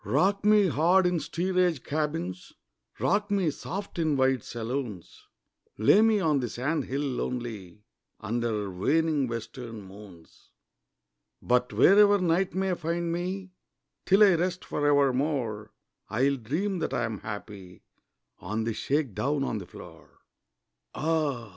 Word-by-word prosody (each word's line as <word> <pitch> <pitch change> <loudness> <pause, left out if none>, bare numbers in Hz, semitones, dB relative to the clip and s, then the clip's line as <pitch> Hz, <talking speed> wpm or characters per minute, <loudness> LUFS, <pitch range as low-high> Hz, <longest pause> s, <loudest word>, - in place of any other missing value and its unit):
Rock 200 +1 +1
me 210 -1 +5
hard 175 +4 +3
in 180 -1 +1
steerage 180 -3 0
cabins, 145 - -3 0.5
Rock 205 +1 +1
me 195 -6 +1
soft 195 +5 -6
in 155 -3 +1
wide 130 -1 +2
saloons, 115 -5 -6 0.5
Lay 110 - +5
me 220 -1 +4
on 155 -6 +2
the 120 -2 -3
sand 140 +4 -2
hill 135 +2 -3
lonely 115 -7 -4 0.4
Under 110 -2 -2
waning 145 - +1
western 115 -1 -7
moons; 95 -3 -15 0.9
But 125 0 +1
wherever 200 - +6
night 180 0 0
may 190 0 0
find 170 0 -2
me 185 +2 -4 0.6
Till 195 +3 +6
I 200 -3 +6
rest 180 +2 -1
for 145 0 -1
evermore 135 -6 +1 0.4
I 110 +5 0
will 140 0 +2
dream 170 - -2
that - - -2
I 120 - 0
am 110 -3 -3
happy 100 -4 -9 0.6
On 110 +5 -3
the 115 0 -2
shake 140 0 -1
down 140 +6 -1
on 115 -5 -2
the 90 - -10
floor. - - -14 0.7
Ah! 150 -7 -1
140 Hz, 135 wpm, -27 LUFS, 115-175 Hz, 0.9 s, wherever